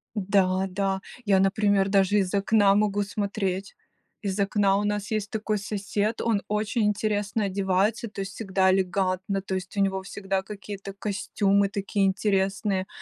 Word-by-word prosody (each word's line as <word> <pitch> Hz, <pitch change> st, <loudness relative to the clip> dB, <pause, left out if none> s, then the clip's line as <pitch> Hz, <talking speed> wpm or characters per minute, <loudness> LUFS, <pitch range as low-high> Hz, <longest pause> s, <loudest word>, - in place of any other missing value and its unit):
Да-да, 195 Hz, -1 st, +1 dB, 0.2 s
я, 195 Hz, -2 st, +4 dB
например, 195 Hz, 0 st, +2 dB
даже 195 Hz, +1 st, +3 dB
из 190 Hz, -2 st, 0 dB
окна 200 Hz, 0 st, +4 dB
могу 205 Hz, -1 st, +2 dB
смотреть. 200 Hz, -1 st, -3 dB, 0.5 s
Из 200 Hz, 0 st, -2 dB
окна 200 Hz, 0 st, +2 dB
у 205 Hz, -, 0 dB
нас 205 Hz, 0 st, -2 dB
есть 215 Hz, -1 st, -1 dB
такой 215 Hz, -1 st, -2 dB
сосед, 205 Hz, +2 st, -2 dB
он 220 Hz, -3 st, +1 dB
очень 215 Hz, +2 st, 0 dB
интересно 210 Hz, 0 st, 0 dB
одевается, 195 Hz, +4 st, 0 dB
то 200 Hz, -, -6 dB
есть 195 Hz, 0 st, -5 dB
всегда 190 Hz, -3 st, +1 dB
элегантно, 190 Hz, +1 st, 0 dB
то 190 Hz, -, -4 dB
есть 185 Hz, +2 st, -6 dB
у -, -, +1 dB
него 190 Hz, -1 st, +1 dB
всегда 195 Hz, 0 st, -3 dB
какие-то 200 Hz, 0 st, -8 dB
костюмы 200 Hz, 0 st, 0 dB
такие 200 Hz, 0 st, 0 dB
интересные, 195 Hz, 0 st, 0 dB
200 Hz, 150 wpm, -26 LUFS, 195-205 Hz, 0.5 s, я